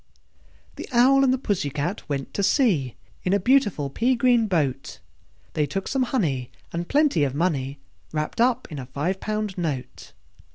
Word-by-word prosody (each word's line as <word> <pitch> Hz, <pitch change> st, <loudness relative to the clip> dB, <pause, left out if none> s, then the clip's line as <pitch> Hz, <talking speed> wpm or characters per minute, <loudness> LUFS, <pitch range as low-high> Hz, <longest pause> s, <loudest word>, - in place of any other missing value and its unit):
The -, -, -7 dB
Owl 260 Hz, +3 st, +5 dB
and 265 Hz, -, +4 dB
the 260 Hz, -, +2 dB
Pussy 205 Hz, -, -1 dB
Cat 150 Hz, +7 st, -4 dB
went 140 Hz, -2 st, -3 dB
to -, -, -1 dB
sea 190 Hz, -, +2 dB, 0.3 s
In 185 Hz, -, +1 dB
a 200 Hz, -, +3 dB
beautiful 205 Hz, -, +2 dB
pea 250 Hz, -, +2 dB
green 240 Hz, -2 st, +3 dB
boat: 145 Hz, -8 st, -1 dB, 0.6 s
They 150 Hz, -1 st, +1 dB
took 195 Hz, +7 st, -3 dB
some 270 Hz, -, 0 dB
honey, 140 Hz, -, 0 dB, 0.2 s
and 170 Hz, +1 st, -3 dB
plenty 285 Hz, -, +3 dB
of 135 Hz, -1 st, -1 dB
money 145 Hz, -5 st, -1 dB, 0.3 s
Wrapped 155 Hz, +8 st, -2 dB
up 250 Hz, +1 st, +2 dB
in 150 Hz, -, -5 dB
a 125 Hz, -, -7 dB
five 155 Hz, +9 st, -2 dB
pound 215 Hz, -3 st, -3 dB
note. 145 Hz, -7 st, -4 dB
180 Hz, 170 wpm, -24 LUFS, 145-240 Hz, 0.6 s, Owl